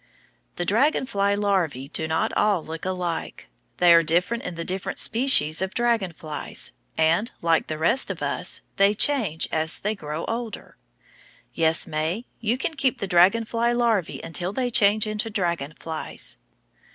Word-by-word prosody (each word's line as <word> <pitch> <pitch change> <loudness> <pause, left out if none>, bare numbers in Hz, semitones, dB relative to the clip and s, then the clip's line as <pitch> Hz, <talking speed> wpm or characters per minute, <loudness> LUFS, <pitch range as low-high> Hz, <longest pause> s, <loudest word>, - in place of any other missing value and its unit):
The 175 - -3
dragon 265 - +2
fly 200 -4 +1
larvæ 175 -10 -1
do 160 - -2
not 160 +1 0
all 205 -6 +2
look 160 +1 -7
alike. 180 - -4 0.3
They 175 -1 +6
are 170 - +7
different 175 +9 +1
in 180 - -5
the 165 0 -5
different 185 0 -3
species 220 - +4
of 190 +1 -3
dragon 235 -6 +1
flies, 155 -2 -4 0.3
and, 165 +8 +2
like 165 -1 +2
the 155 - -4
rest 175 +12 +2
of - - -4
us, - - -1
they 200 +1 +4
change 220 - +1
as 160 0 0
they 210 +2 -1
grow 155 -5 -5
older. 230 -1 -5 0.8
Yes, 160 0 +2
May, 160 +9 -2
you 230 +2 0
can 265 - -2
keep 275 -4 0
the - - -3
dragon 190 +5 +4
fly 235 +1 0
larvæ 230 -7 0
until 175 +3 -3
they 245 +3 -2
change 215 -2 +4
into 215 +1 -2
dragon 170 -7 -2
flies. 160 - -5
190 Hz, 165 wpm, -24 LUFS, 165-225 Hz, 0.8 s, are